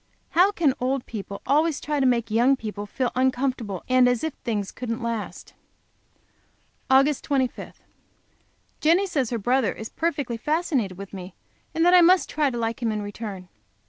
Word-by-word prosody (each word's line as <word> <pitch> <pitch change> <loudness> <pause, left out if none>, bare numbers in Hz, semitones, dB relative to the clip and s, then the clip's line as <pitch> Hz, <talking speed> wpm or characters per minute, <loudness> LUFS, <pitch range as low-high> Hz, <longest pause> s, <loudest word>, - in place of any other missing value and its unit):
How 365 +4 +5
can 320 -9 +2
old 260 +1 -1
people 200 -2 -7
always 300 +3 +2
try 295 -1 -2
to 265 - +3
make 235 -3 +1
young 240 +5 +4
people 210 -4 -6
feel 255 +3 -2
uncomfortable, 255 -6 -1
and 255 -1 +5
as 245 -2 0
if 320 -3 -2
things 205 -4 -3
couldn't 230 -1 -5
last? 230 -2 -5 1.4
Aug. 270 +2 +4
25. 265 -3 -2 1.0
Jenny 340 +6 +3
says 280 - -1
her 235 - -2
brother 245 0 +1
is 220 - -7
perfectly 285 -8 -2
fascinated 270 - -1
with 200 0 -9
me, 185 -1 -8 0.4
and 325 +1 +2
that 355 - +5
I 360 - +8
must 360 +2 +5
try 300 -2 +1
to 240 - -5
like 230 0 -2
him 230 -2 0
in 210 -1 -3
return. 205 -3 -7
250 Hz, 170 wpm, -24 LUFS, 220-290 Hz, 1.4 s, I